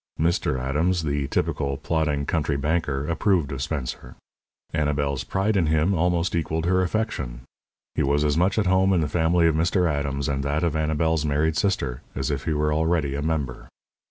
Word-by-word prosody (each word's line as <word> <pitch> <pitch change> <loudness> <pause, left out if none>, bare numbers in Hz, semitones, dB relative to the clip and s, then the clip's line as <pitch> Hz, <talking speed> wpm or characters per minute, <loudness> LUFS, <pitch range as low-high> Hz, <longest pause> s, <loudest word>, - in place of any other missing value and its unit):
Mr. 80 -5 +1
Adams, 80 +7 0
the 70 -2 -1
typical, 70 0 -1
plodding, 75 -2 -1
country 75 -2 0
banker, 75 -1 -1
approved 85 -3 +1
of 70 -1 -4
Spencer. 70 -4 -4 0.6
Annabel's 70 -2 0
pride 100 +3 0
in 90 -5 +2
him 80 +5 +2
almost 85 0 +1
equalled 80 -1 -1
her 90 +1 +3
affection. 85 - -2 0.5
He - - -1
was 70 +2 +2
as 75 -1 +2
much 90 +5 +2
at 110 - +2
home 95 +1 +3
in 90 - +2
the 75 - 0
family 85 +2 +2
of 80 - +4
Mr. 85 +3 +2
Adams 70 -2 -1
and 70 -1 -1
that 75 +4 -1
of 85 -3 0
Annabel's 80 0 +1
married 75 +2 +1
sister 70 -11 -1
as 65 +3 -1
if 70 -2 -3
he 80 - 0
were 75 0 +1
already 80 -2 +1
a 70 - -2
member. 75 -5 -2
80 Hz, 185 wpm, -24 LUFS, 70-85 Hz, 0.6 s, of